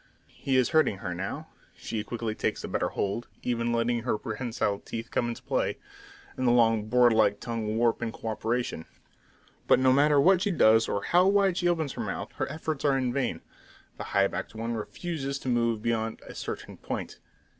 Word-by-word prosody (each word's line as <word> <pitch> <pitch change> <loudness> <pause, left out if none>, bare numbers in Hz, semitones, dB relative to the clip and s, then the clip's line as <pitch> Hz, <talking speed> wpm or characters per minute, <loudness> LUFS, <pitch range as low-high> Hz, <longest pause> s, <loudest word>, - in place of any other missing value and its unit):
He 135 -1 -2
is 130 - +3
hurting 155 - +3
her 95 -2 -4
now. 95 +3 -5 0.3
She 110 -2 -4
quickly 115 0 -3
takes - - -2
a - - -4
better - - -1
hold, 100 +4 -2 0.2
even 120 -1 0
letting 120 0 +1
her 120 -2 0
prehensile 110 -2 -2
teeth 115 0 -7
come 120 - 0
into 115 - -6
play, - - -1 0.6
and 130 - -1
the - - +5
long 115 -3 +3
board 120 0 +5
like 105 -2 +3
tongue 110 -2 -3
warp 115 0 +2
in 115 -1 -2
co 115 - -6
operation; 115 -6 -2 0.8
but - - +6
no 130 0 +4
matter 145 +1 +4
what 185 +5 +5
she 205 - +1
does, 115 - +4
or 100 - -1
how 180 +2 +4
wide 195 -2 +3
she 175 - +1
opens 160 -5 0
her - - -5
mouth, - - -4
her - - -2
efforts 155 -2 -4
are 140 -2 +3
in 125 -2 0
vain: 140 -1 -1 0.6
the - - -4
high 100 - +2
backed 105 - -4
one 115 +1 -3
refuses 140 +5 -4
to 130 - -5
move 115 -2 +1
beyond 115 -1 -1
a - - -9
certain - - -6
point. - - -5
120 Hz, 200 wpm, -28 LUFS, 110-135 Hz, 0.8 s, but